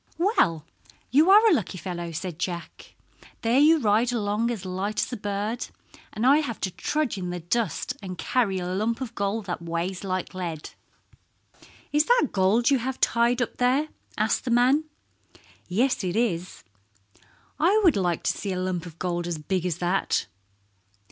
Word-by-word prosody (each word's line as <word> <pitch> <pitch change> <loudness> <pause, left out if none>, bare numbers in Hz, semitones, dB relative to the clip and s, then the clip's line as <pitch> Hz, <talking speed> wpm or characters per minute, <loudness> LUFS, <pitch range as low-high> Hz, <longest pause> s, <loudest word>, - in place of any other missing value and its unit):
"Well, 320 - +2 0.5
you 300 +8 +5
are 425 +3 +8
a 425 - +6
lucky 200 - -1
fellow," 175 -1 -5
said 170 0 -5
Jack. 170 -3 -6 0.5
"There 235 +3 +3
you 315 +3 +6
ride 225 0 +2
along 220 0 0
as 215 -6 -4
light 190 +3 -3
as - - -1
a - - 0
bird, 205 +3 -3 0.4
and 215 +3 -2
I 275 +3 +7
have 280 -8 -2
to 190 - -1
trudge 295 - -2
in 180 -1 -4
the 180 0 -4
dust 220 - -1
and 185 -2 -7
carry 215 -5 0
a 180 - -3
lump 210 +6 -1
of 250 -3 -5
gold 200 +1 -2
that 175 -3 -4
weighs 170 +3 -3
like 185 -1 -3
lead." 170 -4 -5 1.2
"Is 295 +1 +3
that 485 - +3
gold 205 +6 +3
you 270 - +4
have 260 +2 -4
tied 240 +1 +2
up 230 - -7
there?" 260 +5 +2 0.3
asked - - +1
the - - -4
man. 255 +6 +3 0.8
"Yes, 230 +6 +1
it 180 -1 -2
is." 180 - -1 1.0
"I 370 +8 +4
would 340 -7 +5
like 175 -4 0
to - - +2
see 200 - -4
a 180 - -3
lump 180 -1 -2
of 165 -1 -12
gold 175 -1 -2
as 170 -2 -2
big 180 +3 -2
as 170 -3 -2
that." 180 +2 0
205 Hz, 175 wpm, -25 LUFS, 180-250 Hz, 1.2 s, are